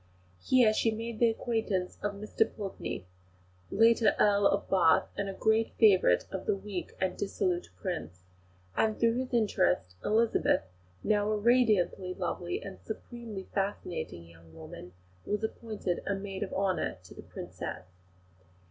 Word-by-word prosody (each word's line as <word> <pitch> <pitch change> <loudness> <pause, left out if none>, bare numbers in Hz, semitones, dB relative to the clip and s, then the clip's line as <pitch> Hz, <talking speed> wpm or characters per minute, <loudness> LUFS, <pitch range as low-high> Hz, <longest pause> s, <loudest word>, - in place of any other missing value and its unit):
Here 245 -4 +4
she 225 - +2
made 225 0 -4
the 235 - +5
acquaintance 220 -5 -2
of 205 0 -1
Mr 215 +2 0
Pulteney, 195 - -5 0.6
later 225 +1 +4
Earl 200 -1 +4
of - - 0
Bath, 180 -4 +4
a 200 -1 -2
great 220 +3 +1
favourite 190 - +5
of 190 -1 -5
the - - +3
weak 195 -3 -6
and 190 -1 0
dissolute 185 -3 -1
Prince; 90 +2 -5 0.5
and 220 -1 +1
through 230 -1 +4
his 260 -1 -4
interest, 90 - +1
Elizabeth, 225 +2 +2 0.4
now 210 0 +2
a 215 - +1
radiantly 210 -5 +2
lovely 175 0 -3
and 195 -1 -8
supremely 220 -2 -7
fascinating 180 - -3
young 85 -1 -17
woman, 85 +2 -10 0.3
was 210 +1 -2
appointed 220 -5 -3
a 200 - +1
maid 195 -1 -6
of 205 - -3
honour 190 - 0
to - - -13
the - - -10
Princess. 90 - -7
200 Hz, 140 wpm, -30 LUFS, 180-220 Hz, 0.6 s, the